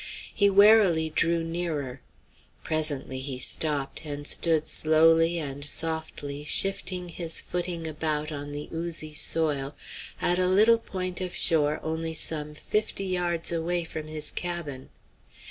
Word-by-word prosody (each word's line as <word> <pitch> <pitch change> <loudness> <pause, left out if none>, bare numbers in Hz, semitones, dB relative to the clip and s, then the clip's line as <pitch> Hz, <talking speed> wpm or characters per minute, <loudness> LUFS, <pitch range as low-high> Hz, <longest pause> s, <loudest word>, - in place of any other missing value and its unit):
He 200 -1 +3
warily 195 -6 +5
drew 165 +1 +1
nearer. 160 -6 -4 0.6
Presently 150 -4 -1
he 130 -1 -5
stopped, 140 +1 -1
and 145 -1 -7
stood 160 0 +2
slowly 165 +2 +4
and 145 -3 -5
softly 150 -2 -2
shifting 180 +2 +2
his 165 -1 +2
footing 175 -2 -2
about 155 -1 -2
on 145 -1 -6
the 145 +1 -6
oozy 160 -2 0
soil, 150 -3 0 0.4
at 175 +1 +1
a 185 - +2
little 215 +5 +4
point 185 -4 -4
of 180 -1 -5
shore 150 -2 +1
only 160 0 -3
some 150 -1 0
fifty 210 +3 -2
yards 175 -3 0
away 170 +1 -1
from 155 -1 -7
his 155 -1 -2
cabin. 170 -7 -4
160 Hz, 130 wpm, -26 LUFS, 150-175 Hz, 0.6 s, warily